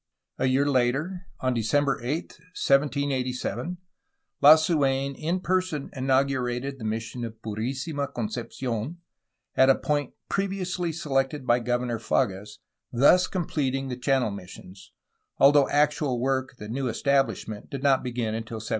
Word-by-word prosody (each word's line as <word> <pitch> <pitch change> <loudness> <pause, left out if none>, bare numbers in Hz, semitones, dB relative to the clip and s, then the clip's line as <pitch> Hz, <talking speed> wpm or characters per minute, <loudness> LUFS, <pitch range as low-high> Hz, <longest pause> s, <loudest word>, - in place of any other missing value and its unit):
A 130 - +2
year 130 +2 +3
later, 145 +8 0
on 130 -1 +1
December 135 +5 +1
8, 145 +8 -3 0.3
1787, 140 +3 0 0.6
Lasu^n 145 -3 +5
in 170 +6 -1
person 185 -6 -1
in 130 -1 -4
augurated 135 0 0
the - - -8
mission 115 +2 -3
of 115 -1 -7
Purlsima 130 +7 -3
Concepci6n, 120 +3 -4 0.6
at 130 0 +5
a 135 - +7
point 145 -3 -2
previously 185 -3 -2
selected 135 -3 -1
by 120 0 +3
Governor 120 -1 -1
Fages, 105 -3 -1 0.3
thus 145 +9 +5
completing 135 -7 -2
the 125 - -3
Channel 125 -2 +1
missions, 95 0 -11 0.5
although 140 0 +6
actual 145 -3 +1
work 130 +1 -1
at - - -28
the 105 - -8
new 130 +4 -2
estabUsh 140 +4 +1
ment 105 -2 -8
did 135 -1 -6
not 135 -2 +4
begin 120 -3 -2
until 115 0 -5
1788. 110 0 -6
135 Hz, 135 wpm, -26 LUFS, 120-145 Hz, 0.6 s, a